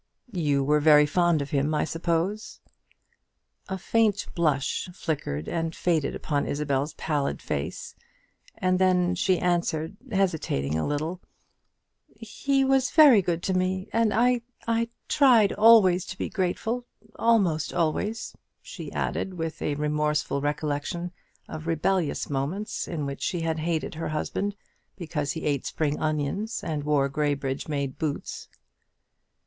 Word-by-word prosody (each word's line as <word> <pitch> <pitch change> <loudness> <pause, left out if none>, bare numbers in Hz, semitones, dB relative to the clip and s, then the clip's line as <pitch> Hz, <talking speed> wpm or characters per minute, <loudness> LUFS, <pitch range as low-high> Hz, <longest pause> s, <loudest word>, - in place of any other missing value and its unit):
"You 145 -6 +1
were 150 +2 +3
very 150 0 +6
fond 170 0 +2
of 140 - -10
him, 145 +2 +1
I - - +1
suppose?" 170 +6 -2 1.1
A 190 - -2
faint 210 +1 +1
blush 150 -1 0
flickered 140 - -3
and 165 -1 -2
faded 160 -5 0
upon 145 -2 -1
Isabel's 145 0 -1
pallid 145 -3 -1
face; 70 +5 -4 0.6
and 185 0 +1
then 180 -1 +3
she 185 +1 +2
answered, 175 0 -1
hesitating 160 - 0
a 80 - 0
little, 155 +5 -2 1.0
"He 270 +5 0
was 265 -1 +3
very 285 -10 +7
good 175 -1 -2
to 190 - 0
me, 185 +2 -1
and 230 -2 +3
I 240 +3 +3 0.3
I 230 0 +1 0.2
tried 240 -8 +5
always 210 -5 +6
to 185 - -7
be - - -3
grateful 220 +5 -2 0.3
almost 195 -10 +2
always," 205 +7 -1 0.2
she - - -9
added, 190 - -2
with 165 -2 -4
a 145 - -1
remorseful 150 -1 0
recollection 150 +4 -2 0.4
of 155 0 -7
rebellious 165 0 0
moments 145 +10 -3
in 155 -4 -3
which 140 0 -5
she 175 - -1
had 160 -1 -1
hated 160 0 -2
her 160 0 -4
husband 195 +6 -2 0.4
because 150 -6 -3
he 160 - -5
ate 140 -3 0
spring 150 -2 -1
onions, 155 +9 -2
and 150 -3 -3
wore 145 -2 +2
Graybridge 140 -1 -2
made 140 -3 -3
boots. 155 -3 -4
165 Hz, 135 wpm, -26 LUFS, 150-190 Hz, 1.1 s, very